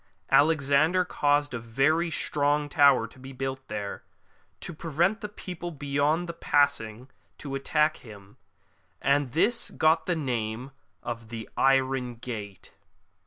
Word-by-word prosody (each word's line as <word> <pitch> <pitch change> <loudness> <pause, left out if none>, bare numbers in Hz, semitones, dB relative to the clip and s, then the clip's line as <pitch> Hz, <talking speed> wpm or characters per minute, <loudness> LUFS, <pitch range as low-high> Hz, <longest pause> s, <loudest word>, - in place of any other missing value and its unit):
Alexander 155 +4 +4
caused 145 -2 +1
a 120 - -3
very 135 +9 +1
strong 145 -1 +1
tower 140 -5 +5
to 115 +3 -15
be 135 +1 -10
built 130 0 -5
there, 105 -1 -5 0.6
to 175 - -7
prevent 170 +7 0
the 210 - -5
people 180 -4 -7
beyond 145 +2 0
from 170 -1 -7
passing 125 -4 +1 0.3
to 140 -2 -7
attack 150 +3 +1
him, 100 -4 -14 0.6
and 140 -2 +1
this 230 +9 +1
got 160 +1 +2
the 175 - +1
name 125 -3 -3 0.3
of 115 -2 -6
the 115 -1 -7
Iron 135 -2 +2
Gate. 105 -5 -8
140 Hz, 130 wpm, -27 LUFS, 120-155 Hz, 0.6 s, tower